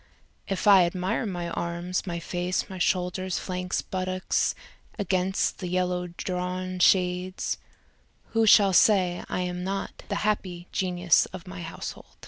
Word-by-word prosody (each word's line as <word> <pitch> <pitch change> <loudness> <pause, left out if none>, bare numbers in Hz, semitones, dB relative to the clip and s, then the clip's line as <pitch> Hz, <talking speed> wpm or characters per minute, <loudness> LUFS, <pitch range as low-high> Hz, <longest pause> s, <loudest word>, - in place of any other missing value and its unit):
If 195 - -2
I 195 -3 +8
admire 185 +6 -1
my 175 -3 -3
arms, 170 +2 -3
my 170 -1 -2
face, 180 +1 -2
my 185 - -6
shoulders, 180 +1 0
flanks, 180 -1 -2
buttocks 185 0 -1 0.4
against 190 -2 0
the 180 - -4
yellow 180 0 0
drawn 180 +1 -4
shades, 180 0 +2 0.7
Who 225 -1 +3
shall 200 -2 +7
say 180 -3 +4
I - - -1
am 180 0 -3
not 195 +1 -4
the - - -1
happy 180 -4 -1
genius 180 -2 +2
of 185 -2 -9
my 185 -1 -7
househo 165 0 -6
180 Hz, 135 wpm, -27 LUFS, 180-190 Hz, 0.7 s, I